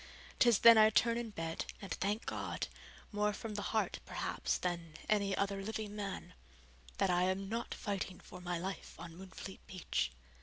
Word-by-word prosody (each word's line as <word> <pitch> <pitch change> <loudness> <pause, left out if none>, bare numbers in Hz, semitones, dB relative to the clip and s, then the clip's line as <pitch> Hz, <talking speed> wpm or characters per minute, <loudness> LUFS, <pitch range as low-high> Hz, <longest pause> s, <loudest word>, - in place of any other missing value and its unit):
'Tis 240 -4 +7
then 230 0 +9
I 215 0 +8
turn 230 +2 +4
in 235 -1 -2
bed 165 -5 -3
and 195 - -8
thank 205 +3 -1
God, - - -2 0.4
more 210 0 +1
from 215 +1 -5
the 205 - -2
heart, 220 -1 +1
perhaps, - - -1
than, 170 -3 -3
any 200 -2 +2
other 200 0 0
living 215 0 -4
man, 200 -2 -4 0.6
that 190 - +3
I 180 0 +4
am 190 +1 0
not 230 +3 -2
fighting 195 -3 -3
for - - -11
my 175 -1 -1
life 190 +3 -5
on 165 0 -8
Moonfleet 190 +1 -8
Beach. 175 - -1
195 Hz, 175 wpm, -35 LUFS, 180-215 Hz, 0.6 s, then